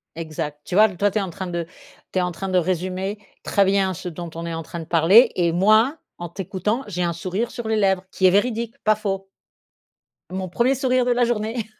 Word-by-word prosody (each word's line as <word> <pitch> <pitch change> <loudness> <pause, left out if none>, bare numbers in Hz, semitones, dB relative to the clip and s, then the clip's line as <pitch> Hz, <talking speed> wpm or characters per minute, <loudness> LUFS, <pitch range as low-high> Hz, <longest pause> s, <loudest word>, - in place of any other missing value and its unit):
Exact 155 -2 -5
tu 180 - -5
vois? 215 +2 +6
Toi 200 +2 0
tu 215 - -3
es 210 - +2
en 190 - -3
train 190 +2 -6
de 170 -1 -3 0.5
tu 185 - 0
es - - +2
en 180 - -1
train 190 +3 -5
de 185 - +2
résumer 185 +3 -2 0.3
très 200 - +2
bien 190 -1 +2
ce 180 - -6
dont 170 +1 -7
on 165 - -5
est 170 - -4
en 165 - -3
train 170 - -7
de 160 - -7
parler 175 +9 +6
et 170 -2 +2
moi 215 - +4 0.2
en 175 0 -5
t'écoutant 195 +7 -2
j'ai 180 -3 -3
un 170 -1 0
sourire 185 +7 -3
sur 240 -2 -6
les 220 0 +1
lèvres 190 -3 +2
qui 190 - +3
est - - +7
véridique 230 +3 0
pas 215 0 +4
faux. 195 -2 -3 1.0
Mon 185 0 -3
1er 245 +8 +2
sourire 255 -1 +1
de 245 - +2
la 245 0 +3
journée. 225 -1 -2
190 Hz, 235 wpm, -22 LUFS, 175-215 Hz, 1.0 s, est